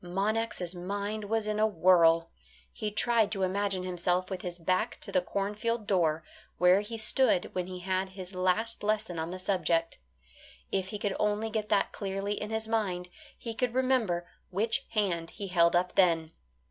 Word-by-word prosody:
Monax' 195 0 -1
mind 200 +4 -4
was 220 +1 0
in 215 0 -1
a 215 - +4
whirl. 165 -3 +4 0.4
He 215 - -3
tried 220 0 +2
to 195 -3 -1
imagine 195 0 0
himself 180 +1 -1
with 185 -1 -3
his 175 -1 -5
back 185 +2 0
to - - -5
the 185 - +3
cornfield 210 +4 -2
door, 165 -5 +1 0.3
where 180 +3 +5
he 225 +2 -6
stood 220 -3 +3
when 180 -1 -2
he 185 -1 -7
had 190 +1 -1
his 190 0 -9
last 185 +5 +1
lesson 210 -4 -1
on 160 +1 -3
the 185 - -5
subject. 170 -3 0 0.7
If 190 -1 0
he 210 - -5
could 205 -1 -2
only 210 +1 0
get 215 -1 -2
that - - +2
clearly 195 0 -3
in 210 0 -5
his 220 0 -2
mind, 190 -6 -1 0.3
he 230 - -6
could 245 +1 -1
remember 240 -10 +1 0.2
which 220 +8 0
hand 180 -7 0
he 200 -2 -7
held 170 -1 +4
up 180 +1 +1
then. 165 -4 +3
195 Hz, 175 wpm, -30 LUFS, 180-215 Hz, 0.7 s, where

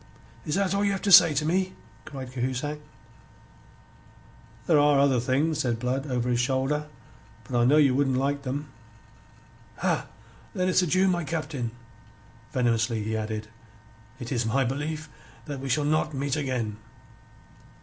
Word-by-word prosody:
"Is 150 - 0
that 195 -1 +1
all 200 - +1
that 205 - +2
you 200 - +1
have 195 - -3
to 200 - +1
say 165 -4 +9
to 150 - 0
me?" 185 +3 0 0.3
cried 130 -3 -8
Cahusac. 130 +4 -3 1.9
"There 155 +1 +4
are 145 -1 +4
other 135 -2 +3
things," 140 +6 0
said 120 -5 0
Blood 130 +4 -2
over 125 -2 -1
his 120 -1 +1
shoulder. 135 +4 0 0.6
"But 120 +4 -2
I 120 - +4
know 145 +5 +5
ye 145 -3 +5
wouldn't 135 0 +1
like 140 +2 0
them." 140 +1 -5 1.1
"Ha! - - -1 0.5
Then 185 0 +1
it's 185 - +4
adieu, 185 +2 +2
my 175 -2 +1
Captain." 150 -6 -3 0.8
Venomously 115 -4 0
he 110 +1 -2
added: 110 0 -4 0.7
"It 120 -3 -7
is 120 -3 0
my 130 +5 +1
belief 150 +5 -3 0.4
that 145 -3 -5
we 135 0 -5
shall 145 +3 +1
not 155 0 0
meet 140 0 -1
again." 125 -7 -2
140 Hz, 160 wpm, -26 LUFS, 125-155 Hz, 1.9 s, say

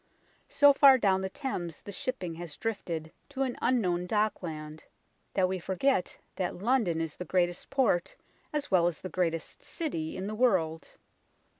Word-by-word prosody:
So 285 -1 +6
far 275 -1 +8
down 190 -5 +2
the 190 - -2
Thames 185 - -5
the 205 - -7
shipping 195 -5 -4
has 165 -2 -8
drifted 170 -8 -3 0.2
to 270 -1 -1
an 255 -2 -2
unknown 180 -8 +1
dockland 160 -8 -2 0.5
that 185 -2 +3
we 185 0 -2
forget 190 +5 0 0.2
that 185 -2 -2
London 205 -5 +1
is 165 -2 -4
the - - -4
greatest 175 0 0
port 220 -10 +1 0.4
as 295 -4 -3
well 175 -2 +5
as 170 -3 -3
the 185 - -5
greatest 165 -3 -2
city 165 - -4
in 190 - -4
the 210 - -4
world. 185 -9 +1
185 Hz, 160 wpm, -29 LUFS, 170-245 Hz, 0.5 s, far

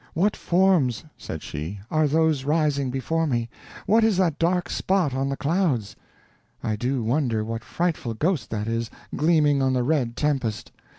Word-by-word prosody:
"What 195 +6 +2
forms," 175 - +2
said 80 - -7
she, 85 +7 -5
"are 155 -1 +3
those 155 -2 +2
rising 145 -2 +1
before 160 +6 -1
me? 120 -4 -1 0.3
What 220 +3 +4
is 220 -4 +3
that 170 -5 +1
dark 175 +1 +1
spot 185 -8 0
on 135 +1 -1
the 140 - -2
clouds? 145 - 0 0.7
I 110 - 0
do 125 +3 -1
wonder 115 -3 0
what 115 0 -4
frightful 160 -9 -2
ghost 155 - 0
that 105 -1 -3
is, 115 0 -2 0.3
gleaming 150 -3 +3
on 130 -1 +2
the 125 -1 +1
red 125 -4 0
tempest? 135 -8 -1
140 Hz, 165 wpm, -24 LUFS, 120-165 Hz, 0.7 s, What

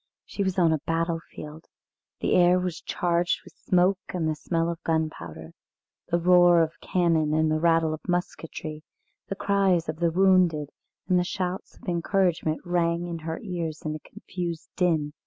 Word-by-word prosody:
She - - -5
was 190 -1 -1
on 170 -3 +4
a 155 - -1
battlefield. 165 -2 -3 0.5
The - - +1
air 180 0 +5
was 180 -2 -3
charged 175 0 0
with - - -15
smoke 185 +1 +2
and 170 -3 -1
the 155 - +1
smell 165 +2 -1
of 170 -1 -4
gunpowder. 85 - -3 0.6
The 170 - +1
roar 175 -1 +6
of 160 0 -5
cannon 165 -4 +1
and 155 0 +2
the 155 - +1
rattle 165 -1 +3
of 155 - -8
musketry, 165 -3 -3 0.5
the 195 - -3
cries 195 -4 +2
of 155 0 -3
the 170 -1 +2
wounded, 180 -4 +3 0.4
and 180 -1 +3
shouts 185 +1 -4
of - - -17
encouragement 175 -2 0
rang 170 -1 0
in 170 -1 -5
her 160 +1 -5
ears 170 -6 -4
in 155 - -2
a 155 - -6
confused 170 0 -6
din. 160 -5 +1
170 Hz, 165 wpm, -26 LUFS, 160-180 Hz, 0.6 s, roar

